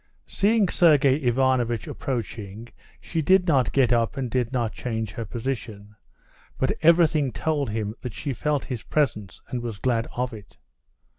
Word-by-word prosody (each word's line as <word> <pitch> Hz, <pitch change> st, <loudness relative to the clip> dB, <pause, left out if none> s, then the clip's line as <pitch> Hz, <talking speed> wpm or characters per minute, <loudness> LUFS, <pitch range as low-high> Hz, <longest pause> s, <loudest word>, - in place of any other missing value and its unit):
Seeing 210 Hz, 0 st, +2 dB
Sergey 145 Hz, -6 st, +4 dB
Ivanovitch 125 Hz, -3 st, +1 dB
approaching, 115 Hz, -3 st, -5 dB, 0.3 s
she 165 Hz, -, -3 dB
did 185 Hz, +4 st, +4 dB
not 135 Hz, -6 st, +3 dB
get 125 Hz, -3 st, +3 dB
up 115 Hz, +3 st, 0 dB
and 130 Hz, -3 st, -3 dB
did 125 Hz, -1 st, 0 dB
not 120 Hz, -4 st, -1 dB
change 110 Hz, -4 st, -4 dB
her 115 Hz, -, -5 dB
position, 110 Hz, -4 st, -5 dB, 0.6 s
but 130 Hz, -, +1 dB
everything 160 Hz, -4 st, +4 dB
told 150 Hz, -3 st, -1 dB
him 105 Hz, -1 st, -3 dB
that 125 Hz, -4 st, -6 dB
she 140 Hz, +4 st, -4 dB
felt 145 Hz, +3 st, -1 dB
his 125 Hz, -5 st, -5 dB
presence 105 Hz, -10 st, -2 dB
and 125 Hz, -, -3 dB
was 115 Hz, -3 st, -5 dB
glad 115 Hz, 0 st, 0 dB
of 125 Hz, 0 st, -2 dB
it. 105 Hz, -2 st, -12 dB
125 Hz, 155 wpm, -25 LUFS, 115-145 Hz, 0.6 s, Sergey